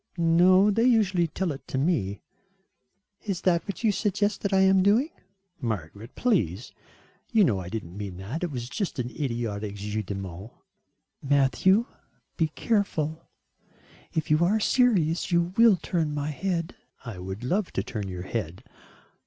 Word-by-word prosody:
"No, 180 +4 +5
they 225 +4 +2
usually 200 -8 +3
tell 175 +2 -2
it 140 - -9
to - - -3
me." 125 - 0 1.0
"Is 195 -5 -3
that 170 -2 +2
what 200 - -5
you 220 - +4
suggest 205 +1 0
that 200 - -1
I 190 -1 +4
am 190 0 +5
doing?" 225 - +3 0.5
"Margaret, 110 - -5
please. 125 - 0 0.6
You 220 -3 +5
know 110 - +2
I 90 -1 -6
didn't 100 -4 -6
mean 100 -3 -6
that. 110 - -5
It 175 - -1
was 125 -5 -5
just 195 - -3
an 125 -1 -3
idiotic 115 -7 -3
jeu 105 +2 -3
de 100 -1 -5
mots." 95 +3 -8 0.7
"Matthew, 145 - +3 0.5
be 160 - +1
careful; 160 -4 -1 0.8
if 160 -1 -2
you 155 +2 +4
are 205 +5 +3
serious 200 -10 +2
you 170 +1 +1
will 230 -3 +6
turn 160 -3 -2
my 145 +1 -2
head." 170 +1 -2 0.3
"I 110 -6 -7
would 95 +5 -6
love 185 +9 0
to - - -1
turn 105 -4 -5
your 90 -1 -6
head." 95 -4 -4
160 Hz, 160 wpm, -26 LUFS, -, 1.0 s, will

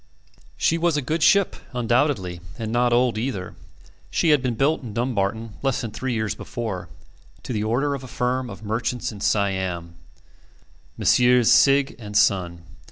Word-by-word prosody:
She 165 - +1
was 170 -2 +2
a - - 0
good 155 +5 -2
ship, 200 +3 +4 0.2
undoubtedly, 120 - 0 0.2
and 110 -2 -4
not 120 +1 +2
old 120 -2 +2
either. 110 -7 -4 0.6
She 170 - +1
had 150 -3 +4
been 125 -3 -1
built 145 +7 +1
in 115 -5 -8
Dumbarton 115 -2 -1
less 135 -3 0
than 115 - -5
three 130 +2 -3
years 110 -2 -1
before, 110 -7 -5 0.5
to - - -5
the 105 -1 -1
order 130 +6 0
of 135 -2 -5
a - - -8
firm 125 +1 -2
of 100 0 -10
merchants 120 +3 -2
in 100 -2 -10
Siam 95 -5 -1 1.0
Messrs. 125 -1 +4
Sigg 140 +2 +4
and 105 -2 -3
Son. 90 -4 +2
120 Hz, 165 wpm, -23 LUFS, 105-130 Hz, 1.0 s, ship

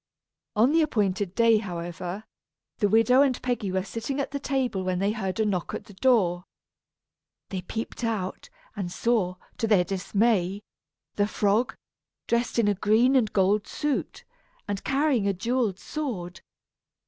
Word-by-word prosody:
On 230 +6 +4
the 325 +1 +4
appointed 200 - 0
day, 230 -1 +5
however, 175 0 -5 0.6
the 205 -3 +3
widow 225 +5 +5
and 270 -3 +2
Peggy 240 -6 -1
were 190 0 0
sitting 230 +7 -4
at 280 - -2
the 280 - -3
table 260 -9 -1
when 185 -1 -1
they 200 +3 +1
heard 195 -3 -3
a 220 - +3
knock 185 -5 -1
at - - -6
the 205 - -15
door. 190 -6 +2 1.1
They 190 -2 -3
peeped 225 +6 -5
out, 215 -5 -3 0.3
and 190 -4 -4
saw, 205 -4 +1 0.2
to 225 - +1
their 205 -5 +4
dismay, 195 +1 0 0.5
the 205 0 +3
frog, 210 +3 +1 0.5
dressed 235 0 0
in 230 -3 +3
a 205 - +4
green 220 +7 +3
and 225 -6 +3
gold 200 +2 +2
suit, 295 -2 -2 0.4
and 200 -1 -3
carrying 270 -6 +1
a 200 - +2
jewelled 230 0 0
sword. 195 - -5
210 Hz, 155 wpm, -26 LUFS, 190-240 Hz, 1.1 s, day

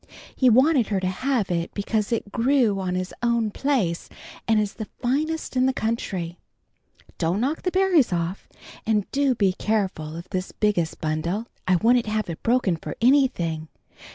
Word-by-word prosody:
He 255 - +4
wanted 260 +1 +4
her 200 -3 0
to 185 - -3
have 220 +3 0
it 170 -1 -1
because 210 +1 -1
it 220 -3 -2
grew 235 -4 +2
on 185 -1 -2
his 185 0 -3
own 235 -2 +1
place 215 -11 -1 0.4
and 220 -1 +4
is 210 -1 -1
the 220 - -6
finest 300 +5 -1
in 255 0 +3
the 265 - +1
country. 190 -8 -3 0.8
Don't 170 +3 +1
knock 275 +7 -1
the 365 - 0
berries 365 - +3
off, 175 +2 -3 0.3
and 210 -3 +1
do 275 -2 +2
be 195 -4 +2
careful 190 -8 -2
of 170 +2 -8
this 185 -1 -3
biggest 200 -7 0
bundle. 165 +7 -1 0.2
I 185 - +4
wouldn't 235 +5 +3
have 215 -4 -1
it 160 - -8
broken 230 -8 +2
for - - -7
anything. 225 - +2
215 Hz, 170 wpm, -24 LUFS, 185-255 Hz, 0.8 s, He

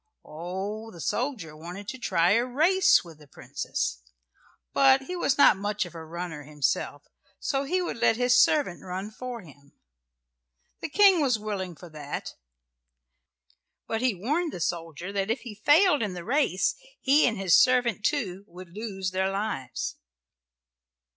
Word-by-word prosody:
Oh, 190 +8 -5
the 175 - -13
soldier 215 - -3
wanted 175 +6 -9
to 260 - -6
try 180 -5 +2
a 230 +3 +4
race 345 +9 +4
with 165 -3 -14
the 150 - -16
princess; - - -4 0.7
but 270 0 +5
he 360 +6 -5
was 280 -6 +1
not 285 - +6
much 205 0 -2
of 175 - -11
a 165 -1 -8
runner 165 -1 -6
himself, 145 -1 -2 0.3
so 275 0 -1
he 365 +5 0
would 345 - -4
let 230 -1 +3
his 245 0 +3
servant 285 - +2
run 190 +3 -6
for 245 +1 -7
him. 140 -4 -18 1.1
The - - -5
King 390 0 +5
was 255 -5 +2
willing 200 -4 -4
for 175 - -12
that, 150 -2 -6 1.5
but 225 0 -2
he 250 -5 +1
warned 300 - -1
the - - -6
soldier 170 +2 -4
that 195 0 -1
if 230 +2 -1
he 235 - -8
failed 295 - +4
in 205 -4 -2
the 175 - -7
race 250 -6 +1 0.3
he 285 +3 +4
and 225 - -1
his 190 -3 +1
servant, 245 -5 +2
too, 200 -10 -1
would 180 0 -12
lose 195 -4 -4
their 190 +1 0
lives. 195 - -3
205 Hz, 160 wpm, -27 LUFS, 175-255 Hz, 1.5 s, not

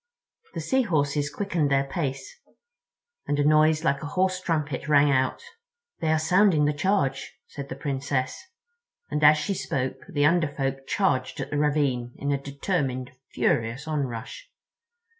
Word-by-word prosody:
The - - -3
Sea 265 -1 +2
Horses 145 - 0
quickened 175 -4 -1
their 135 0 +3
pace—and 170 - -7
a 145 - +2
noise 155 +1 +4
like 140 -4 +1
a 145 - -5
hoarse 185 +3 0
trumpet 150 -6 -2
rang 145 -1 +5
out. 130 - 0 0.6
"They 160 - 0
are 160 - +3
sounding 165 -1 +3
the 150 - +2
charge," 150 -4 -1
said 140 -1 -8
the - - -5
Princess; 135 -1 -2 0.8
and 150 - -1
as 150 +1 +8
she 150 +7 -1
spoke 135 -7 -2
the 145 -5 +1
Under 170 +1 +3
Folk 135 -1 -3
charged 190 -10 0
at - - -5
the 145 - -1
ravine, 140 -5 0
in 140 - -2
a 140 -1 -1
determined, 140 -3 -2 0.2
furious 120 +6 0
onrush. 145 - -4
145 Hz, 150 wpm, -26 LUFS, 135-165 Hz, 0.8 s, as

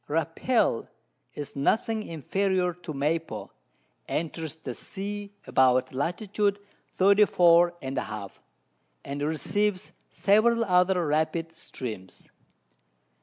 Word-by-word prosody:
Rapel 165 - +1 0.5
is 145 -1 -6
nothing 220 - +1
inferior 185 - -1
to 170 -2 -9
Maypo, 155 +3 -2 0.6
enters 160 -1 -3
the 145 -6 -6
Sea 200 +7 -6
about 130 0 +3
Lat. 165 - -2 0.7
34. 180 -3 +5
and 135 +1 -4
a - - -2
half, 105 -2 -8 0.6
and 140 +1 -5
receives 185 +6 -1 0.2
several 230 +3 +3
other 180 -2 +3
rapid 160 +2 0
Streams. 115 - -8
165 Hz, 95 wpm, -27 LUFS, 145-195 Hz, 0.7 s, 34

